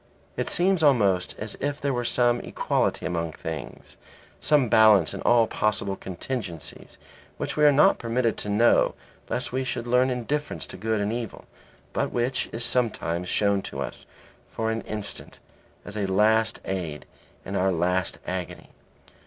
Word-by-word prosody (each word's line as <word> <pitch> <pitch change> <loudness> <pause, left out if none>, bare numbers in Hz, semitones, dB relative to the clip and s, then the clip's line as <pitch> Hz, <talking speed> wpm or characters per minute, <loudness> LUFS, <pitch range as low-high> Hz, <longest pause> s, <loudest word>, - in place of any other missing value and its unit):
It - - -1
seems 185 0 +3
almost 100 - +3
as 110 -1 -3
if 145 +1 -2
there 140 -1 -1
were 120 -1 -1
some 120 0 +2
equality - - -1
among 85 -2 -2
things, - - -7 0.4
some 145 -4 +3
balance 105 -7 +5
in - - -6
all 120 -1 +4
possible 105 -3 0
contingencies 95 - -6 0.4
which - - -3
we 150 - +4
are 145 - +8
not 150 +8 +5
permitted 115 -1 0
to 105 - -5
know 115 +4 +3 0.3
lest - - -2
we 130 +1 -1
should 120 -2 -3
learn 125 +2 +3
indifference 135 +4 -2
to - - -8
good 110 +2 -1
and 105 +2 -1
evil, 120 -3 -5 0.5
but - - -1
which 125 +2 -1
is 115 +1 -2
sometimes 90 -8 -1
shown 100 -1 +2
to - - -7
us - - -6 0.4
for 110 0 -2
an 110 0 -2
instant 105 -2 -6 0.5
as 105 - -8
a 100 -2 -1
last 110 +3 +3
aid 85 -6 -4 0.4
in 100 - -5
our 95 0 +2
last 90 +2 0
agony. 90 -1 -5
110 Hz, 160 wpm, -25 LUFS, 95-125 Hz, 0.5 s, are